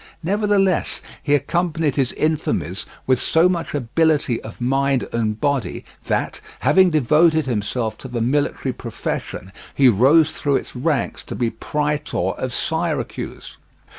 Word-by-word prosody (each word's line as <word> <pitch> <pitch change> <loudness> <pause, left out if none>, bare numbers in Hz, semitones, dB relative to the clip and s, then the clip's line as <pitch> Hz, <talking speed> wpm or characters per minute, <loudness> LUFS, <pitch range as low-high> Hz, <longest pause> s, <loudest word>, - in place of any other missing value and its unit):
Nevertheless, 200 0 +1 0.2
he 145 -1 +2
accompanied 160 0 0
his 135 -3 +1
infamies 145 - -1 0.2
with 130 -1 +2
so 165 +2 +4
much 175 -4 -2
ability 145 -1 +1
of - - -10
mind 135 +1 +1
and 110 -2 -1
body 135 -9 -1 0.2
that, - - -1 0.2
having 190 -1 +5
devoted 155 +2 +3
himself 110 -1 -2
to - - -8
the 120 -2 -3
military 135 +5 0
profession, 95 - -5 0.2
he 135 -2 +6
rose 140 +9 +4
through 140 -1 0
its - - -3
ranks 135 0 -1
to - - -6
be 120 -2 0
Praetor 150 -10 -1
of 130 - -4
Syracuse. 160 +2 -3
145 Hz, 135 wpm, -21 LUFS, 125-160 Hz, 0.2 s, he